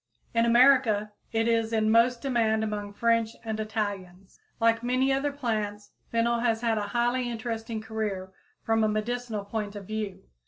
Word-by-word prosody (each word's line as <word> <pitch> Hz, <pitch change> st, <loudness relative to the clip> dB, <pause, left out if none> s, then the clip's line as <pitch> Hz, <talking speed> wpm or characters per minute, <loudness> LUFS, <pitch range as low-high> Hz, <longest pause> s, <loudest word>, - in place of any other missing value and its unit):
In 230 Hz, 0 st, +3 dB
America 235 Hz, -4 st, +4 dB, 0.2 s
it 225 Hz, 0 st, +1 dB
is 230 Hz, -1 st, +1 dB
in 220 Hz, -1 st, +2 dB
most 235 Hz, +1 st, +3 dB
demand 225 Hz, -5 st, +1 dB
among 210 Hz, -1 st, -3 dB
French 230 Hz, +1 st, +1 dB
and 220 Hz, -1 st, -3 dB
Italians. 200 Hz, -4 st, -4 dB, 0.2 s
Like 230 Hz, 0 st, +3 dB
many 255 Hz, +2 st, +2 dB
other 280 Hz, +2 st, 0 dB
plants, 215 Hz, -6 st, -3 dB, 0.2 s
fennel 235 Hz, +1 st, +2 dB
has 230 Hz, -2 st, +1 dB
had 225 Hz, -2 st, +1 dB
a 205 Hz, -, -3 dB
highly 245 Hz, +1 st, +1 dB
interesting 225 Hz, -1 st, -4 dB
career 215 Hz, -4 st, -4 dB, 0.3 s
from 225 Hz, 0 st, +2 dB
a -, -, +4 dB
medical 215 Hz, 0 st, -2 dB
point 210 Hz, 0 st, -4 dB
of 200 Hz, -1 st, -7 dB
view. 215 Hz, -1 st, -4 dB
225 Hz, 160 wpm, -27 LUFS, 215-235 Hz, 0.3 s, America